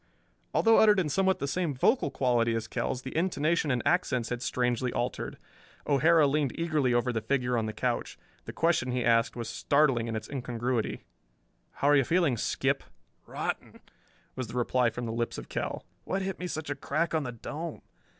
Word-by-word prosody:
Although 225 Hz, 0 st, +5 dB
uttered 210 Hz, -2 st, +6 dB
in 165 Hz, -5 st, 0 dB
somewhat 190 Hz, +4 st, +2 dB
the 140 Hz, -, -3 dB
same 155 Hz, 0 st, -1 dB
vocal 225 Hz, -, +2 dB
quality 120 Hz, -3 st, +1 dB
as 115 Hz, 0 st, -3 dB
Kell's 125 Hz, +2 st, -3 dB
the 130 Hz, -, -7 dB
intonation 165 Hz, -2 st, +1 dB
and 125 Hz, -2 st, 0 dB
accents 130 Hz, -10 st, +1 dB
had 125 Hz, -1 st, -3 dB
strangely 125 Hz, 0 st, 0 dB
altered. 120 Hz, +1 st, -3 dB, 0.5 s
O'Hara 155 Hz, +3 st, +4 dB
leaned 140 Hz, -1 st, 0 dB
eagerly 155 Hz, -6 st, +1 dB
over 120 Hz, +1 st, +1 dB
the 110 Hz, -, -1 dB
figure 125 Hz, +1 st, 0 dB
on 115 Hz, -2 st, 0 dB
the -, -, -2 dB
couch. 120 Hz, +3 st, -2 dB, 0.3 s
The -, -, -6 dB
question 160 Hz, -7 st, +1 dB
he 125 Hz, -1 st, 0 dB
asked 115 Hz, -1 st, +3 dB
was 120 Hz, -2 st, -4 dB
startling 130 Hz, 0 st, +2 dB
in 115 Hz, -, -3 dB
its 110 Hz, 0 st, -5 dB
incongruity: 125 Hz, -3 st, -2 dB, 0.7 s
"How 140 Hz, -, +1 dB
are 145 Hz, -, +6 dB
you 140 Hz, -, +5 dB
feeling, 165 Hz, -2 st, +2 dB
Skip!" 110 Hz, -, 0 dB, 0.5 s
"Rotten," -, -, -4 dB, 0.6 s
was 130 Hz, -2 st, -4 dB
the 115 Hz, -, -9 dB
reply 125 Hz, 0 st, +2 dB
from 120 Hz, +1 st, -5 dB
the 115 Hz, -, -3 dB
lips 115 Hz, +1 st, -2 dB
of -, -, -8 dB
Kell. -, -, -4 dB, 0.2 s
"What 195 Hz, +1 st, -2 dB
hit 190 Hz, -1 st, -4 dB
me 180 Hz, -, -3 dB
such 155 Hz, -4 st, -4 dB
a -, -, -1 dB
crack 170 Hz, +4 st, -1 dB
on 160 Hz, -, +2 dB
the 125 Hz, -4 st, -4 dB
dome? 150 Hz, +7 st, -6 dB
130 Hz, 190 wpm, -29 LUFS, 120-160 Hz, 0.7 s, uttered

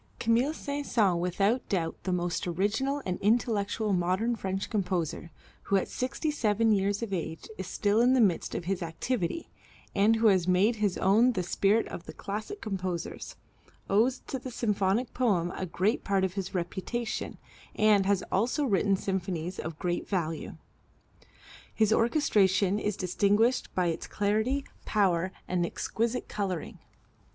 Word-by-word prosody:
Camille 235 Hz, +5 st, +2 dB
Saint 285 Hz, -1 st, -4 dB
Saëns, 195 Hz, -7 st, +2 dB
without 195 Hz, +8 st, 0 dB
doubt 165 Hz, -4 st, -1 dB
the 185 Hz, -, 0 dB
most 175 Hz, 0 st, -1 dB
original 220 Hz, +11 st, 0 dB
and 180 Hz, -1 st, -2 dB
intellectual 215 Hz, -1 st, +1 dB
modern 185 Hz, +7 st, +1 dB
French 195 Hz, -2 st, -3 dB
composer, 180 Hz, -5 st, -2 dB, 0.4 s
who 200 Hz, -, +1 dB
at 195 Hz, -, +2 dB
sixty 270 Hz, +5 st, -2 dB
seven 225 Hz, -5 st, +2 dB
years 200 Hz, +1 st, +1 dB
of 210 Hz, -4 st, -4 dB
age 165 Hz, -2 st, -4 dB
is 190 Hz, -, -4 dB
still 205 Hz, +4 st, +1 dB
in 250 Hz, +2 st, +5 dB
the 260 Hz, -, +4 dB
midst 195 Hz, -7 st, +2 dB
of 170 Hz, -, -3 dB
his 190 Hz, 0 st, -1 dB
activity, 175 Hz, -, -2 dB, 0.5 s
and 210 Hz, +3 st, +4 dB
who 225 Hz, +1 st, 0 dB
has 190 Hz, -5 st, +4 dB
made 195 Hz, +6 st, +3 dB
his 205 Hz, -3 st, 0 dB
own 220 Hz, +6 st, +4 dB
the 185 Hz, -5 st, -1 dB
spirit 200 Hz, +5 st, +2 dB
of 170 Hz, -, -8 dB
the -, -, -7 dB
classic 215 Hz, -, -5 dB
composers, 185 Hz, -4 st, -4 dB, 0.6 s
owes 230 Hz, +6 st, +3 dB
to 265 Hz, -, -4 dB
the 255 Hz, -, -7 dB
symphonic 210 Hz, 0 st, 0 dB
poem 190 Hz, -9 st, +1 dB
a 185 Hz, -, -3 dB
great 190 Hz, +7 st, 0 dB
part 195 Hz, -1 st, +1 dB
of 190 Hz, -1 st, 0 dB
his 195 Hz, -1 st, -4 dB
reputation, 220 Hz, +7 st, -3 dB, 0.4 s
and 210 Hz, -3 st, +4 dB
has 200 Hz, -2 st, +2 dB
also 240 Hz, +9 st, +1 dB
written 200 Hz, -3 st, +2 dB
symphonies 185 Hz, -2 st, -3 dB
of 160 Hz, -1 st, -5 dB
great 175 Hz, 0 st, -2 dB
value. 165 Hz, -5 st, -2 dB, 1.2 s
His 220 Hz, -1 st, +3 dB
orchestration 205 Hz, -, +3 dB
is 210 Hz, -1 st, -2 dB
distinguished 205 Hz, +6 st, +2 dB
by 180 Hz, -, +2 dB
its 165 Hz, -, -4 dB
clarity, 220 Hz, +7 st, 0 dB, 0.2 s
power 185 Hz, -4 st, +1 dB, 0.2 s
and 180 Hz, -1 st, 0 dB
exquisite 230 Hz, +7 st, -2 dB
coloring. 190 Hz, -5 st, -4 dB
200 Hz, 155 wpm, -29 LUFS, 185-230 Hz, 1.2 s, in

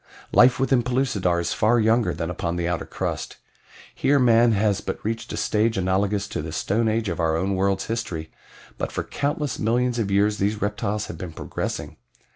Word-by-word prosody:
"Life 125 Hz, +1 st, +6 dB
within 135 Hz, -1 st, +3 dB
Pellucidar 120 Hz, -8 st, 0 dB
is 85 Hz, -, -1 dB
far 115 Hz, +3 st, +3 dB
younger 110 Hz, +1 st, +3 dB
than 80 Hz, +1 st, -3 dB
upon 85 Hz, -1 st, -3 dB
the 85 Hz, -1 st, -1 dB
outer 85 Hz, -1 st, -2 dB
crust. -, -, -4 dB, 0.6 s
Here 145 Hz, +1 st, +2 dB
man 120 Hz, -2 st, +5 dB
has 100 Hz, -1 st, +1 dB
but -, -, -4 dB
reached 115 Hz, +1 st, -3 dB
a -, -, -4 dB
stage 110 Hz, +1 st, +1 dB
analogous 95 Hz, +2 st, 0 dB
to -, -, -3 dB
the 80 Hz, +1 st, -6 dB
Stone 105 Hz, +8 st, 0 dB
Age 110 Hz, 0 st, 0 dB
of 85 Hz, -1 st, -3 dB
our 80 Hz, -1 st, +2 dB
own 95 Hz, +3 st, 0 dB
world's 95 Hz, 0 st, 0 dB
history, 85 Hz, -9 st, -4 dB, 0.5 s
but -, -, -2 dB
for -, -, -3 dB
countless 145 Hz, -1 st, -2 dB
millions 120 Hz, +2 st, +1 dB
of 105 Hz, -3 st, -1 dB
years 105 Hz, +2 st, +2 dB
these 105 Hz, +2 st, 0 dB
reptiles 105 Hz, 0 st, -2 dB
have 85 Hz, -, -8 dB
been 90 Hz, -4 st, -6 dB
progressing. -, -, -5 dB
105 Hz, 190 wpm, -24 LUFS, 95-115 Hz, 0.6 s, Life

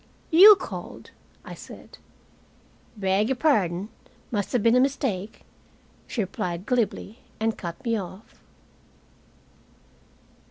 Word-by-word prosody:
"You 395 Hz, +6 st, +10 dB
called," -, -, -9 dB, 0.3 s
I -, -, -8 dB
said. -, -, -13 dB, 1.0 s
"Beg 195 Hz, +2 st, +1 dB
y'pardon. 210 Hz, -, +1 dB, 0.4 s
Must 205 Hz, -4 st, -2 dB
have 245 Hz, -5 st, 0 dB
been 230 Hz, +1 st, +4 dB
a -, -, +5 dB
mistake," 250 Hz, -7 st, -1 dB, 0.7 s
she 235 Hz, -, -2 dB
replied 180 Hz, -2 st, -4 dB
glibly, 235 Hz, -2 st, -2 dB, 0.2 s
and 220 Hz, 0 st, 0 dB
cut 170 Hz, +7 st, -8 dB
me 230 Hz, -1 st, +1 dB
off. 190 Hz, +2 st, -11 dB
220 Hz, 105 wpm, -25 LUFS, 190-250 Hz, 1.0 s, You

